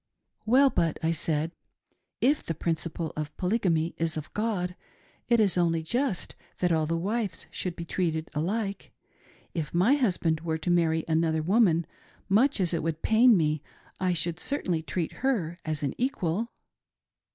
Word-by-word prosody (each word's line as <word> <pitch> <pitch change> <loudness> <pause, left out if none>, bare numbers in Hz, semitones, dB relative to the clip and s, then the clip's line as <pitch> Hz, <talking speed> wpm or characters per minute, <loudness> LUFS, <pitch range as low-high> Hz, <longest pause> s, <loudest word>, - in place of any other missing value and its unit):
" - - -54
Well 265 +4 +6
but," 165 -2 +1
I 160 - +2
said, 160 0 -1 0.4
" - - -55 0.3
if 290 +4 +3
the 165 - -4
principle 165 0 -2
of 150 -1 -5
Polygamy 180 -5 +1
is 165 -1 +1
of 155 - -7
God, 200 -5 -1 0.5
it 235 -1 +5
is 195 -4 +3
only 165 -2 +2
just 240 - -1 0.2
that 180 -1 +1
all 160 -2 +2
the 165 +1 0
wives 200 0 -2
should 180 -2 -3
be 170 - -6
treated 160 -2 -1
alike. 195 +6 -2 0.6
If 160 -1 -3
my 190 +10 +5
husband 180 - +1
were 160 -1 -1
to 160 +2 -1
marry 160 -2 +2
another 160 -1 +1
woman, 175 -3 +3 0.4
much 225 +7 +3
as 180 -2 +1
it 165 - 0
would 165 0 -3
pain 225 0 +6
me, 155 -2 +1 0.4
I 185 -1 +1
should 170 0 -1
certainly 180 - -1
treat 165 +1 -3
her 190 -11 0
as 155 -2 -2
an 140 - -1
equal." 230 -4 -1
170 Hz, 165 wpm, -28 LUFS, 160-210 Hz, 0.6 s, Well